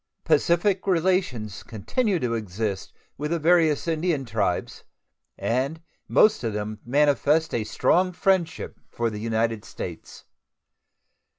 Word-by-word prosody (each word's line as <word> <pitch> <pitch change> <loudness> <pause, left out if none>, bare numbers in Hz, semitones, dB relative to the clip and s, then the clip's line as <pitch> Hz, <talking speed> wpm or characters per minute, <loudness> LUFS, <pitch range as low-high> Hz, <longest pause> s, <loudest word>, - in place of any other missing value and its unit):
Pacific 175 +5 +2
relations 165 - 0
continue 190 - -1
to 125 -4 -1
exist 105 -2 -3 0.3
with 150 +1 -2
the 170 - +1
various 165 -2 +3
Indian 160 -3 0
tribes, 105 -6 -2 0.5
and 135 +7 -1 0.3
most 215 -6 +4
of 115 -2 -1
them 105 +1 -4
manifest 145 +4 +2
a 115 - 0
strong 180 - +2
friendship 180 -2 0
for 115 -1 -2
the 105 - -6
United 115 0 -1
States. - - -8
145 Hz, 115 wpm, -25 LUFS, 110-170 Hz, 0.5 s, most